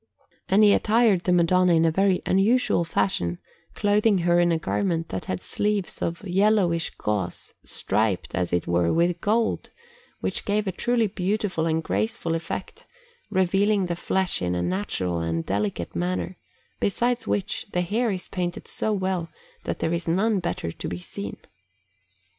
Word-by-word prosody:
And 200 +3 +5
he 205 -1 +7
attired 220 -4 +3
the 180 - +2
Madonna 180 +1 +4
in 165 0 +4
a 165 - +3
very 190 +2 +2
unusual 200 0 +3
fashion, 90 - 0 0.4
clothing 205 0 +3
her 175 0 +4
in 175 0 +3
a 165 - +2
garment 165 0 -1
that 95 - -4
had 95 - -3
sleeves 205 - -1
of 170 +4 -3
yellowish 185 -3 +2
gauze, 100 -5 -3
striped, 100 -3 -1
as 90 -2 -1
it 85 -1 0
were, 85 -1 +2
with 170 +1 +1
gold, 220 +2 0 0.5
which - - -1
gave 210 +1 0
a 190 - -1
truly 235 +5 +1
beautiful 190 -3 -1
and 160 0 0
graceful 220 -3 -1
effect, 165 +3 -5 0.4
revealing 195 +2 +2
the 175 -1 -2
flesh 190 +1 0
in 90 0 0
a 90 - -1
natural 90 -1 -1
and 85 0 -2
delicate 100 -3 -2
manner; 90 0 -2 0.4
besides 240 +4 0
which, 205 0 -2
the 180 - +1
hair 225 +7 0
is 185 -3 -3
painted 180 +1 -4
so 220 - -1
well 185 -4 -1 0.4
that - - -2
there 160 - -1
is 170 0 -2
none 195 +5 +2
better 170 - -3
to - - -6
be 85 - -4
seen. 100 +3 -7
175 Hz, 160 wpm, -25 LUFS, -, 0.5 s, he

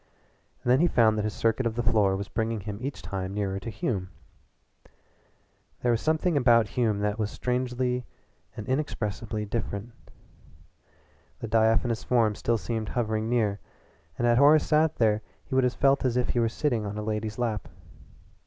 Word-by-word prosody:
And 120 - +2
then 130 - +5
he 175 - +4
found 115 -8 +4
that - - 0
his 105 0 -3
circuit 115 +2 +1
of 115 - -4
the 120 - -1
floor 105 -5 +3
was 100 +1 -4
bringing 110 0 -2
him 100 +1 -6
each 130 -8 -5
time 95 +1 -4
nearer 100 -2 -2
to 115 - -6
Hume. 105 -3 -3 1.7
There 120 - +3
was 115 - +1
something 160 +2 +1
about 120 -5 +4
Hume 110 -5 0
that 105 +1 -1
was 105 -1 0
strangely 125 +1 -2 0.5
and 105 - -6
inexpressibly 110 -6 -2
different. 105 +1 -4 1.5
The 115 - -6
diaphanous 110 +1 +2
form 115 -4 +2
still 115 +3 0
seemed 110 -1 -3
hovering 110 -2 -1
near, 110 -4 +1 0.6
and 120 - 0
had 120 0 +4
Horace 145 +2 +6
sat 155 0 +2
there 110 -2 +2 0.2
he - - -8
would 130 0 +3
have 125 0 +2
felt 140 0 +3
as 125 -2 +1
if 125 - 0
he 120 - +1
were 115 -1 +2
sitting 120 -3 -1
on 105 0 -5
a 105 - -3
lady's 105 0 -3
lap. 115 -4 -2
115 Hz, 175 wpm, -27 LUFS, 105-125 Hz, 1.7 s, Horace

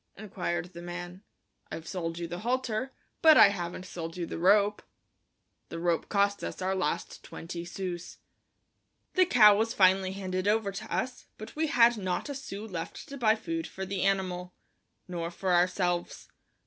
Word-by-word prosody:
inquired 180 -4 -4
the 170 - -8
man. 175 +1 -7 0.5
"I've 165 - -6
sold 165 -3 -4
you 170 -1 -4
the 175 +1 -6
halter, 250 +1 -1 0.3
but 315 -2 +8
I 200 - +9
haven't 180 -2 -5
sold 165 -2 -6
you 175 - -2
the - - -6
rope." 205 +3 +4 0.9
The 170 - -6
rope 170 -1 0
cost 200 0 +1
us - - -5
our 190 +1 0
last 180 -6 -2
twenty 170 +1 -7
sous. 175 -1 -6 1.0
The 370 -1 +4
cow 215 - +7
was 225 +2 0
finally 190 0 +4
handed 185 -1 -3
over 210 -1 +2
to 215 +3 -8
us, 255 0 -3
but 215 - -10
we 315 +1 0
had 240 -3 +5
not 185 +6 -2
a - - -3
sou 215 -6 -7
left 175 -6 -7
to 280 - -7
buy 220 -2 +4
food 330 +9 -4
for 190 - -6
the 190 -1 -3
animal, 185 -2 -1 0.5
nor 170 -2 -3
for 180 +1 -1
ourselves. 175 0 0
190 Hz, 170 wpm, -29 LUFS, 175-215 Hz, 1.0 s, I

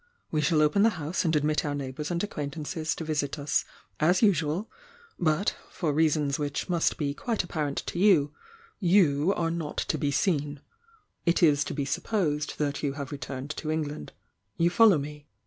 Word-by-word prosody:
We 155 - +1
shall 155 +1 +3
open 150 +7 +3
the 225 - +6
house 160 +3 -2
and 160 -1 +2
admit 150 +1 +1
our 145 -1 -2
neighbours 140 +1 -4
and 175 -1 -1
acquamt 145 -9 -4
anees 155 0 -3
to - - -5
visit 150 -2 -2
us 145 0 0 0.3
as 175 +7 +3
usual, 180 0 +2 0.5
but 160 +3 +1
— - - -24
for 160 -5 -2
reasons 150 -2 +2
which 145 -1 -2
must 175 -3 +1
be 140 -2 -1
quite 225 +7 -2
apparent 150 -5 -3
to 175 - -4
you 165 -8 +4 0.2
— 460 0 -28 0.2
you 155 -1 +4
are 165 -1 0
not 165 -3 -4
to - - -1
be 145 - 0
seen. 145 -3 0 0.7
It 170 +1 +3
is 150 -3 +5
to - - -4
be 140 - -1
supposed 165 -3 -1
that 145 -1 -1
you 140 -2 -1
have 140 -2 -6
returned 140 0 -5
to 155 - -4
England. 150 - -3 0.5
You 170 +1 +3
follow 215 -3 +6
me?" 145 0 -7
150 Hz, 190 wpm, -27 LUFS, 145-170 Hz, 0.7 s, the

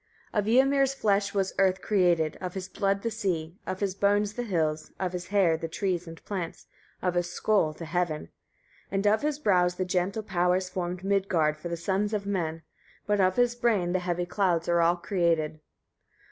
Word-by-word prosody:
40. 210 - +2
Of 225 +5 +5
Ymir's 275 -1 +2
flesh 200 -5 +1
was 195 -1 0
earth 190 -1 +3
created, 175 -6 +2
of 180 -1 -5
his 185 -1 -4
blood 195 0 -1
the 230 - -1
sea, 185 -6 -3
of 185 +1 -4
his 195 -2 0
bones 205 +1 +2
the 245 - -3
hills, 160 -8 -1
of 185 -1 -2
his 180 0 -5
hair 195 -5 +3
trees 175 +1 -2
and 165 0 -11
plants, 185 -5 -5 0.4
of 180 -1 +1
his 175 0 0
skull 200 -4 +2
the 165 +2 -8
heaven; 160 - -2 0.6
41. - - -16
And 195 +1 0
of 215 +1 +4
his 295 -1 0
brows 180 -9 +2
the 185 - -1
gentle 185 +4 -1
powers 185 -1 +1
formed 180 0 -4
Midgard 190 -6 +1
for 155 +3 -7
the 170 - -3
sons 200 +5 0
of 200 -1 -3
men; 165 -5 -2 0.4
but 205 0 +1
of 185 0 +3
his 245 -1 +3
brain 225 -8 +1
the 185 - +2
heavy 175 0 -1
clouds 175 -2 0
are 170 0 +3
all 170 +1 +4
created. 170 -4 0
185 Hz, 195 wpm, -28 LUFS, 175-205 Hz, 0.6 s, Of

